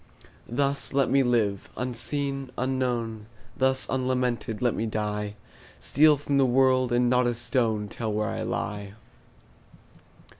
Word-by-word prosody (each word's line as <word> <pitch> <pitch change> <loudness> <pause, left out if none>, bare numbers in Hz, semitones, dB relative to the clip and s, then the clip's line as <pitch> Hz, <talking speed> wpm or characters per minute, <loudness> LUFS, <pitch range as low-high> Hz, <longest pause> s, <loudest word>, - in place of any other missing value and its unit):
Thus 140 +4 -1
let 135 -1 +2
me 140 - +5
live, 115 -6 +1
unseen, 135 +2 -2
unknown; 120 -4 -2 0.3
Thus 130 0 +1
unlamented 125 -3 -1
let 120 -2 +1
me 115 - -2
die; 105 -1 -3 0.4
Steal 150 +1 +4
from 140 0 0
the - - +5
world, 130 0 +3
and 120 0 +3
not 125 0 +3
a 120 - 0
stone 115 -3 0
Tell 110 +1 -4
where 105 0 -1
I - - -4
lie. 100 -1 -4
125 Hz, 135 wpm, -26 LUFS, 110-130 Hz, 0.4 s, me